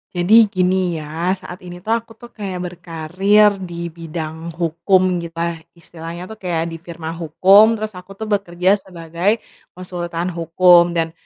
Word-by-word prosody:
Jadi 215 +6 +6
gini 185 -2 0
ya, 160 +4 -2
saat 180 -1 -10
ini 175 -1 -11
tuh 220 - -3
aku 230 0 -2
tuh 240 +1 -14
kayak 190 -4 -5
berkarier 185 +5 +1
dibidang 165 -2 -6
hukum 180 +2 +1
gitulah 170 0 -4 0.2
istilahnya 170 0 -9
tuh 220 - -10
kayak 170 -2 -2
di 165 - -7
firma 165 -1 -7
hukum, 190 +7 +5
terus 215 0 -4
aku 185 0 -12
tuh 220 - -7
bekerja 195 -2 +1
sebagai 180 +4 -2 0.3
konsultan 175 -1 -4
hukum 170 +1 +4
dan, 165 -1 0
175 Hz, 145 wpm, -19 LUFS, 170-195 Hz, 0.3 s, Jadi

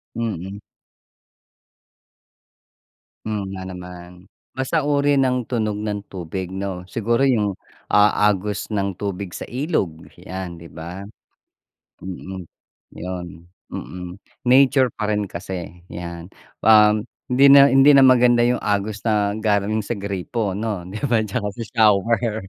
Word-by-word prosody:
Mhm. 100 -4 -4 2.7
Hmm, 110 -1 -2
nga 95 - -6
naman. 90 0 -11 0.3
Basta 140 +4 0
uri 145 -1 +2
ng 125 -2 +1
tunog 110 -4 -1
ng 105 -1 -3
tubig, 90 0 -5
'no? 95 -2 -4
Siguro 115 +4 0
yung 105 -7 +2 0.4
a 105 0 +4
agos 100 0 -2
ng 100 -1 -1
tubig 100 -2 -4
sa - - -6
ilog 120 - -2
'yan, 90 -2 -7
di 85 - -12
ba? 85 +4 -8 1.0
Mhm, 95 0 -7 0.5
'yon, 90 0 -5 0.4
mhm. 90 +1 -7 0.3
Nature 130 0 +5
pa 105 - -3
rin 105 -1 0
kasi 90 -1 -7
'yan, 85 -1 -7 0.4
um, 105 -1 +6 0.3
hindi 130 +3 +4
na 140 0 +8
hindi 135 +2 +6
na 135 - +7
maganda 125 -2 +5
yung 125 0 +1
agos 105 +1 -1
na 105 -2 +2
galing 105 0 +1
sa 120 - -2
gripo 100 +2 -3
'no, 105 -3 -3
di 100 +3 -7
ba, 115 -3 +2
at - - -4
tsaka 105 -2 -2
sa 115 - -5
shower. 110 +1 +3
105 Hz, 130 wpm, -21 LUFS, 95-115 Hz, 2.7 s, na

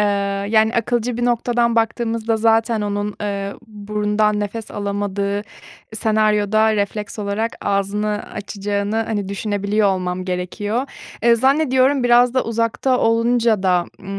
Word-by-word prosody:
Eee, 210 - +3 0.4
yani 220 +1 +3
akılcı 240 +1 0
bir 240 - -1
noktadan 240 -1 +1
baktığımızda 225 0 0
zaten 225 0 +2
onun, 205 0 -2
eee, 200 -1 -3
burundan 210 0 -1
nefes 215 +2 -5
alamadığı 200 0 -2 0.5
senaryoda 215 0 +2
refleks 205 +1 -3
olarak 210 +2 -2
ağzını 205 +1 -1
açacağını, 205 0 -3
hani, 220 -3 -2
düşünebiliyor 205 +1 0
olmam 185 -1 -2
gerekiyor. 205 +7 -2 0.4
Eee, 235 0 +5
zannediyorum, 265 +1 +2
biraz 245 +1 +4
da 260 - +2
uzakta 230 +3 0
olunca 230 -2 +2
da, 180 -2 +2
ımm, 195 0 -6
215 Hz, 125 wpm, -20 LUFS, 205-230 Hz, 0.5 s, Eee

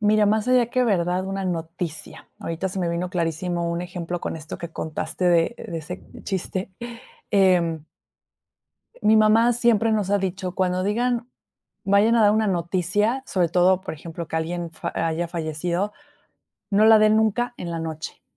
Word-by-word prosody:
Mira, 210 0 +4
más 215 +2 +1
allá 250 -2 +4
que 255 0 +1
verdad, 180 -3 +1
una 195 0 -3
noticia. 165 -1 -5
Ahorita 165 +3 -3
se 190 - -5
me 175 - 0
vino 170 +2 -2
clarísimo 170 0 -1
un 170 +1 -2
ejemplo 175 -1 -5
con - - -4
esto 155 0 -8
que 170 -1 -6
contaste 160 +3 -4
de 175 +5 +3
de 165 -2 -6
ese 180 +4 -8 0.2
chiste, 190 0 -3 0.6
em 175 -6 +3 1.2
Mi 215 +1 +5
mamá 225 +3 +5
siempre 225 -2 +2
nos 205 -3 0
ha 205 - +4
dicho 190 -1 -3
cuando 185 -1 0
digan 240 +3 0 0.6
vayan 205 +4 +4
a 230 - +4
dar 205 -1 +6
una 215 0 +2
noticia, 190 +8 0
sobre 175 -3 0
todo, 185 +1 +3
por - - -5
ejemplo, 165 +1 -7
que - - -5
alguien 170 +1 -3
fa - - -5
haya 165 +1 -1
fallecido, 170 +4 -2 0.8
no 205 +2 +4
la 220 0 +8
den 215 0 +5
nunca 230 +3 +1
en 170 - -6
la 165 - -3
noche, 160 -1 -6
185 Hz, 170 wpm, -23 LUFS, 170-215 Hz, 1.2 s, la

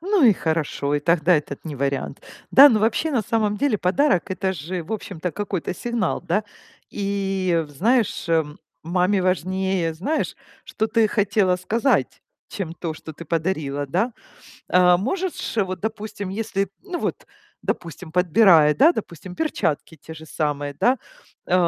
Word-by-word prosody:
Ну 390 +1 +1
и 220 - +8
хорошо. 155 -4 -1
И 145 - +1
тогда 170 +2 +3
этот 145 0 -5
не 155 -3 -5
вариант, 140 0 -2 0.3
да? 280 +2 +10
Но 220 -4 +3
вообще, 230 +9 +1
на 245 -6 +1
самом 210 -1 0
деле 265 -6 +1
подарок- 190 - +1
это 190 0 -1
же, 175 +2 -5
в 160 - -7
общем-то, 185 -5 -4
какой-то 195 -3 -3
сигнал, 235 +1 -2
да? 205 +5 -1 0.5
И 195 -4 -1
в - - -17
знаешь, 220 - +1
э, 165 -2 +3 0.4
маме 180 +4 +1
важнее, 185 -1 0
знаешь, 285 - -2 0.3
что 220 - -2
ты 225 -1 +2
хотела 200 -3 +2
сказать, 225 +9 0 0.3
чем 185 -5 -5
то, 160 -1 -4
что 160 0 -10
ты 170 - -10
подарила, 155 -4 -2
да? 190 - 0 0.6
Э, 180 -1 +5
можешь 345 - -3
вот, 185 -3 0
допустим, 215 -2 -5
если 200 -1 -2
ну, 365 -3 -5
вот, - - -3 0.4
допустим, 170 0 -5
подбирая, 170 -3 +5
да, 315 +5 +6
допустим, 180 - -7
перчатки 160 - -2
те 160 - -11
же 160 0 -11
самые, 145 -2 -2
да, 250 - +2 0.5
э, - - -1
185 Hz, 155 wpm, -23 LUFS, 165-220 Hz, 0.6 s, да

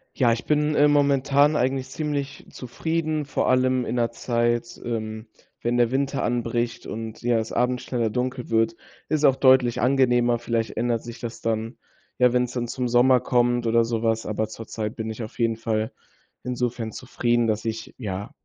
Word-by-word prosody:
Ja, 120 -3 +3
ich 115 - -5
bin, 150 0 +2
äh, 145 - +5
momentan 140 0 +3
eigentlich 130 -1 0
ziemlich 140 -1 -4
zufrieden. 155 +4 -2
Vor - - -1
allem 130 -1 +2
in 115 - -3
'ner 120 -1 +1
Zeit, 120 0 -1
ähm, 110 -1 -4 0.3
wenn 120 +1 0
der 120 -1 +3
Winter 140 +1 0
anbricht 120 0 -1
und, 110 0 -6
ja, 120 -1 +2
es 110 - -4
abends 125 +1 0
schneller 120 -3 -1
dunkel 125 +2 -3
wird, 115 0 +2 0.3
ist 155 0 +2
auch 135 - +5
deutlich 130 -3 +4
angenehmer. 120 -2 +3
Vielleicht 115 -1 -1
ändert 115 0 0
sich 120 0 -9
das 120 -2 -7
dann, 115 +1 -2 0.4
ja, 125 -1 +5
wenn's 125 -1 +1
dann 120 -1 -2
zum 125 +1 -2
Sommer 125 +2 +5
kommt 120 -1 +1
oder 115 +1 +4
so 115 -1 -2
was, 115 -1 0
aber 110 +1 -1
zur 110 +1 -9
Zeit 110 -1 -4
bin 110 0 -4
ich 110 +2 -6
auf 110 - -9
jeden 115 -1 +1
Fall 110 -1 -1 0.5
insofern 125 -2 -2
zufrieden, 120 0 0
dass 110 0 -1
ich, 115 0 -4
ja, 100 -4 -5
120 Hz, 180 wpm, -24 LUFS, 115-130 Hz, 0.5 s, äh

